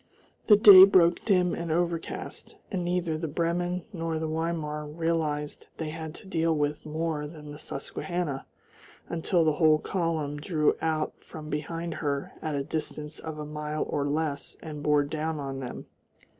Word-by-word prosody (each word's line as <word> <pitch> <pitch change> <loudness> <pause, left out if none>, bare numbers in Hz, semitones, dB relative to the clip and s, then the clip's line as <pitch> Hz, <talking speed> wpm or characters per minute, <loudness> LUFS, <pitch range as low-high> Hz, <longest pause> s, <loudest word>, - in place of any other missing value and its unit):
The 210 - +9
day 200 -2 +11
broke 180 -3 +5
dim 180 -4 +3
and 170 -1 -3
overcast, 170 0 -2 0.2
and 185 -4 -1
neither 175 -3 -1
the 165 - -2
Bremen 175 +3 -1
nor 165 -2 -2
the 160 - -2
Weimar 155 -2 -2
realised 155 -2 -2
they 155 -2 -3
had 160 0 -6
to - - -12
deal 165 -3 +1
with 150 +1 -1
more 155 -1 -2
than 150 -1 -10
the 150 - -9
Susquehanna 155 0 -4 0.6
until 170 0 +1
the 155 - +3
whole 155 0 +5
column 160 -4 -2
drew 150 0 +1
out 155 -1 0
from 155 -1 -9
behind 165 +3 -3
her 140 -3 -2
at 155 -2 -2
a 140 - -1
distance 150 0 -4
of 160 -1 -6
a 150 - -5
mile 150 0 -3
or 145 0 -1
less 145 -1 -2
and 150 -2 -6
bore 150 0 +3
down 155 +1 -3
on 135 -1 -4
them. 125 -2 -6
160 Hz, 165 wpm, -28 LUFS, 150-170 Hz, 0.6 s, day